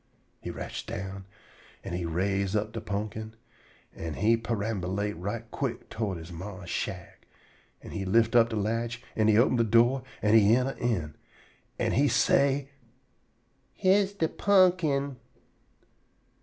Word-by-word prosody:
He -, -, -7 dB
rotch -, -, -6 dB
down, 95 Hz, 0 st, -6 dB, 0.6 s
an' 95 Hz, -, -6 dB
he 90 Hz, -1 st, -2 dB
raise 95 Hz, +4 st, 0 dB
up 105 Hz, +1 st, 0 dB
de 115 Hz, -, -5 dB
pumpkin, 110 Hz, +2 st, -4 dB, 0.6 s
an' 80 Hz, -2 st, -5 dB
he 110 Hz, +4 st, +3 dB
perambulate 105 Hz, -3 st, -2 dB
right 100 Hz, +7 st, -4 dB
quick 125 Hz, -4 st, -4 dB
to 105 Hz, -3 st, -2 dB
he 85 Hz, 0 st, -8 dB
ma's 90 Hz, 0 st, -7 dB
shack, 90 Hz, -4 st, -5 dB, 0.6 s
an' -, -, -9 dB
he 100 Hz, -, -3 dB
lift 115 Hz, +5 st, +2 dB
up 115 Hz, -1 st, +6 dB
de 110 Hz, -, -3 dB
latch, 115 Hz, +3 st, -2 dB
an' 110 Hz, -1 st, +2 dB
he 110 Hz, -1 st, +5 dB
open 120 Hz, +1 st, +4 dB
de 115 Hz, -, +4 dB
do', 120 Hz, +4 st, +4 dB, 0.2 s
an' 105 Hz, 0 st, +3 dB
he 110 Hz, 0 st, +6 dB
yenter 130 Hz, +2 st, 0 dB
in. 90 Hz, -11 st, -1 dB, 0.6 s
An' -, -, 0 dB
he 140 Hz, +4 st, +3 dB
say: 140 Hz, 0 st, +2 dB, 1.1 s
"Yere's 195 Hz, +1 st, +3 dB
de 165 Hz, -5 st, 0 dB
pumpkin." 170 Hz, -9 st, +2 dB
110 Hz, 140 wpm, -28 LUFS, 100-120 Hz, 1.1 s, up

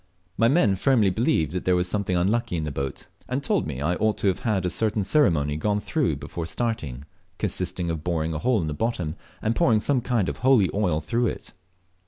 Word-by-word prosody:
My 115 Hz, -, +3 dB
men 115 Hz, -, +3 dB
firmly 110 Hz, -4 st, +3 dB
believed 110 Hz, -, +1 dB
there 90 Hz, 0 st, +1 dB
was 90 Hz, 0 st, +1 dB
something 95 Hz, -1 st, -1 dB
unlucky 105 Hz, +2 st, 0 dB
in 80 Hz, -, -2 dB
the 75 Hz, -, -3 dB
boat, 70 Hz, -1 st, -4 dB, 0.2 s
and 130 Hz, +3 st, -2 dB
told 200 Hz, +1 st, +1 dB
me 70 Hz, -3 st, -5 dB
I 85 Hz, +4 st, +1 dB
ought 110 Hz, 0 st, +1 dB
to -, -, 0 dB
have 95 Hz, -, -1 dB
had 105 Hz, -6 st, 0 dB
a -, -, +1 dB
certain 110 Hz, -2 st, 0 dB
ceremony 80 Hz, -, +2 dB
gone 105 Hz, +5 st, 0 dB
through 115 Hz, -, 0 dB
before 80 Hz, +4 st, -6 dB
starting, 80 Hz, -, -3 dB, 0.3 s
consisting 85 Hz, -2 st, -2 dB
of 80 Hz, -2 st, -4 dB
boring 80 Hz, -2 st, -1 dB
a 75 Hz, -, -3 dB
hole 125 Hz, +2 st, +2 dB
in 80 Hz, -, -2 dB
the 75 Hz, -, -2 dB
bottom 90 Hz, -4 st, -2 dB, 0.3 s
and 110 Hz, +1 st, +1 dB
pouring 110 Hz, -1 st, +3 dB
some 130 Hz, +3 st, +1 dB
kind 120 Hz, -6 st, 0 dB
of -, -, -3 dB
holy 125 Hz, -6 st, +4 dB
oil 90 Hz, -7 st, +1 dB
through 115 Hz, +10 st, 0 dB
it. -, -, -6 dB
100 Hz, 215 wpm, -25 LUFS, 80-115 Hz, 0.3 s, holy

